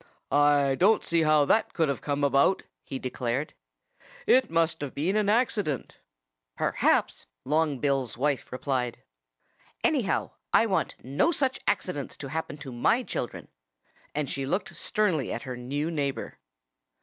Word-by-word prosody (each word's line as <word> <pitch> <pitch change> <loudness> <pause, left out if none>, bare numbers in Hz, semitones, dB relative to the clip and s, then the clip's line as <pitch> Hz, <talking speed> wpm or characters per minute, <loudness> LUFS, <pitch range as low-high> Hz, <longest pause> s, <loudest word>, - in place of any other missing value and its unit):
"I 145 -1 +4
don't 210 +4 +4
see 170 -1 +2
how 155 -2 +4
that 220 +10 +2
could 165 -3 +2
have 140 - -2
come 145 0 -2
about," 140 +6 +3 0.2
he 135 - -5
declared. 130 +2 -3 0.7
"It 255 -2 +4
must 165 -1 +1
have 145 -2 -5
been 170 +8 0
an 210 -1 +2
accident." 210 - 0 0.6
"Perhaps!" - - +1 0.2
Long 150 0 +1
Bill's 135 -4 -1
wife 140 +1 -1
replied. 125 -2 -2 0.8
"Anyhow, - - +1 0.2
I - - +6
want - - 0
no 140 - +2
such 270 -4 0
accidents 145 -7 -1
to 135 - -7
happen 160 -1 -4
to 135 -3 -8
my 170 - +2
children." 125 - -5 0.7
And 150 -1 -1
she 135 +1 -3
looked 185 +8 -2
sternly 185 - 0
at 115 - -4
her 130 -1 -5
new 140 +6 -3
neighbor. 140 -4 -3
145 Hz, 145 wpm, -27 LUFS, 135-170 Hz, 0.8 s, I